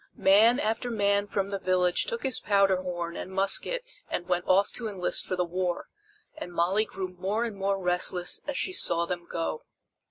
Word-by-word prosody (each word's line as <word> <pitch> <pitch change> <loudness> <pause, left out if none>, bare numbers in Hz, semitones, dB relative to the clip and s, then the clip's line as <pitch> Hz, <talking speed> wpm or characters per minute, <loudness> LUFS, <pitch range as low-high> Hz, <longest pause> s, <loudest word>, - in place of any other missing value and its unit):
Man 220 +6 +5
after 225 +2 -1
man 200 -2 +1
from 200 -1 -2
the 200 - -2
village 180 -1 +2
took 470 -1 -4
his 260 -3 0
powder 195 -2 +3
horn 175 -2 -4
and 185 - -6
musket 195 - +1 0.3
and 175 - -3
went 180 0 0
off 195 +2 +3
to 235 - -4
enlist 190 -4 -1
for 185 - -1
the 180 -1 0
war, 180 0 -3 0.5
and 245 -13 -7
Molly 180 +5 +1
grew 190 -3 -5
more 190 +5 -2
and 225 -3 -5
more 195 0 0
restless 180 -1 +1
as 285 - -2
she 370 - -1
saw 170 - +3
them 175 0 -5
go. 170 - -3
190 Hz, 190 wpm, -27 LUFS, 180-210 Hz, 0.5 s, Man